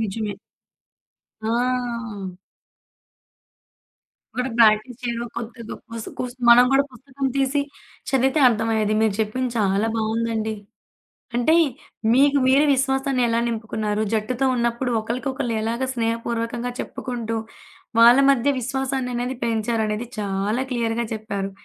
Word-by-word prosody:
నిజమే. 210 -1 -3 1.0
ఆ! 235 -4 -2 2.0
కూడా 250 +1 -1
ప్రాక్టీస్ 225 +2 +4
చేయడం 235 -1 -2
కొద్దో 235 +1 -6
గొప్పో 235 - -10
వసు 225 - -6
కుసు 250 0 -4
మనం 240 +1 +9
కూడా 275 +1 +4
పుస్తకం 270 +2 -5
తీసి 275 +1 +1 0.5
చదివితే 270 +3 +2
అర్థమయ్యేది 220 -2 +1
మీరు 220 -3 +2
చెప్పింది 245 +4 -1
చాలా 200 +1 +2
బాగుందండి. 220 0 -1 0.8
అంటే 245 +6 +3 0.6
మీకు 280 +2 +5
మీ 260 - +4 0.2
విశ్వాసాన్ని 265 0 0
ఎలా 230 0 +1
నింపుకున్నారు 215 -2 -2
జట్టుతో 230 +4 0
ఉన్నప్పుడు 235 +1 0
ఒకళ్ళకి 240 +5 -3
ఒకళ్ళు 260 -3 -2
ఎలాగా 235 +4 -1
స్నేహపూర్వకంగా 230 +1 -2
చెప్పుకుంటూ, 230 -3 -4 0.6
వాళ్ళ 235 +2 +8
మధ్య 275 +1 +2
విశ్వాసాన్ని 265 0 -2
అనేది 245 +1 -2
పెంచారు 225 0 0
అనేది 215 +3 -3
చాలా 205 +4 -1
క్లియర్‌గా 235 -1 -1
చెప్పారు. 200 -3 -4
235 Hz, 115 wpm, -23 LUFS, 220-255 Hz, 2.0 s, మనం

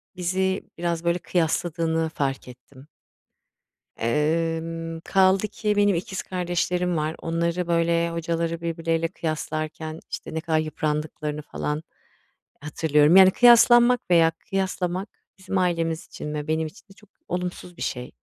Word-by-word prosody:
bizi 190 +1 -1
biraz, 170 -1 -2
böyle, 170 +1 +1
kıyasladığını 165 -1 0
fark 135 -4 -3
ettim. 130 +2 -15 1.1
Emm, 165 +4 -1
kaldı 190 +2 +3
ki 210 0 -2
benim 205 -2 +3
ikiz 190 +2 -4
kardeşlerim 180 -1 -1
var. 155 +1 -1
Onları 170 +1 -1
böyle 170 0 +1
hocaları 165 0 -2
birbirleriyle 165 0 -1
kıyaslarken, 155 -1 -4
işte, - - -6
ne 160 - -1
kadar 160 -1 0
yıprandıklarını 150 -1 -3
falan 150 +1 -4 0.8
hatırlıyorum. 150 +2 +3
Yani, 190 -1 +9
kıyaslanmak 240 +2 +6
veya 165 -2 +5
kıyaslamak 185 +1 -3 0.3
bizim 190 0 -2
ailemiz 165 -2 0
için 150 0 -7
ve 150 0 -4
benim 160 0 0
için 200 +7 -18
de 195 - -17
çok 210 0 -22 0.2
olumsuz 180 0 -4
bir - - -7
şey. 125 -1 -4
165 Hz, 130 wpm, -24 LUFS, 160-180 Hz, 1.1 s, Yani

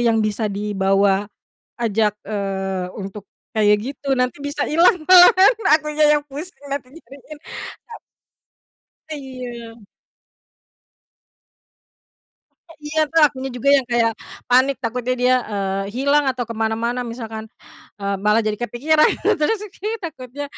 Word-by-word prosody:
yang 230 -2 +2
bisa 215 0 -1
dibawa 195 -1 +1 0.5
ajak, 220 -3 0
eee, 195 -3 -3
untuk 200 0 -8 0.2
kayak 210 -1 +4 0.2
gitu, 275 0 -2
nanti 250 +3 -1
bisa 285 +1 -2
hilang 345 +5 +4
malahan, 370 +3 +7 0.2
akunya 305 0 -1
yang 295 - -2
pusing 290 0 -9
nanti 275 -3 -4 0.2
cariin. 280 +2 -13 0.5
A 460 - -10 1.2
Iya. 250 -5 -8 2.9
Eh, 330 - -15
iya 310 +1 -1
tuh, 325 - +3
akunya 270 -2 -1
juga 265 +3 -1
yang 265 -3 -1
kayak 235 -1 +2 0.4
panik 260 +2 +4
takutnya 245 +2 -2
dia, 250 +1 +3 0.2
eee, 195 -1 -2
hilang 280 +3 +2
atau 250 -1 -3
ke 230 - -7
mana-mana, 225 +2 -1
misalkan, 220 -2 -7 0.5
eee, 200 0 -1
malah 210 +2 +3
jadi 215 -1 -2
kepikiran 280 +7 +2 0.3
terus 420 +9 +1
aki 425 +3 -5
takutnya 285 -3 -7
245 Hz, 120 wpm, -20 LUFS, 215-290 Hz, 2.9 s, malahan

